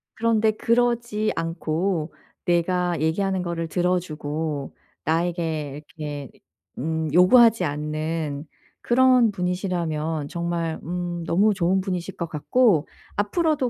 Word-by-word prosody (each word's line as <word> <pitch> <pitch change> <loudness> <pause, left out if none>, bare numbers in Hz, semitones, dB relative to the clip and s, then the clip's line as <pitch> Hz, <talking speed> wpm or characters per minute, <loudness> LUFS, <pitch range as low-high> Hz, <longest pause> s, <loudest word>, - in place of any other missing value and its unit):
그런데 220 -1 +2
그러지 235 -1 +1
않고 165 0 -1 0.3
내가 175 -1 +1
얘기하는 190 +4 0
거를 170 -2 -3
들어주고 160 -5 -2 0.3
나에게 160 -3 -1 0.2
이렇게 145 -3 -5 0.5
음 160 +2 -2
요구하지 225 +4 +6
않는 150 0 -3 0.4
그런 250 -2 +4
분이시라면 175 -5 -2
정말 170 0 -2
음 175 0 -3
너무 205 +6 +3
좋은 190 0 +2
분이실 185 -1 -4
것 170 - -2
같고 165 - +2 0.3
앞으로도 285 - +1
175 Hz, 250 characters per minute, -24 LUFS, 160-200 Hz, 0.5 s, 요구하지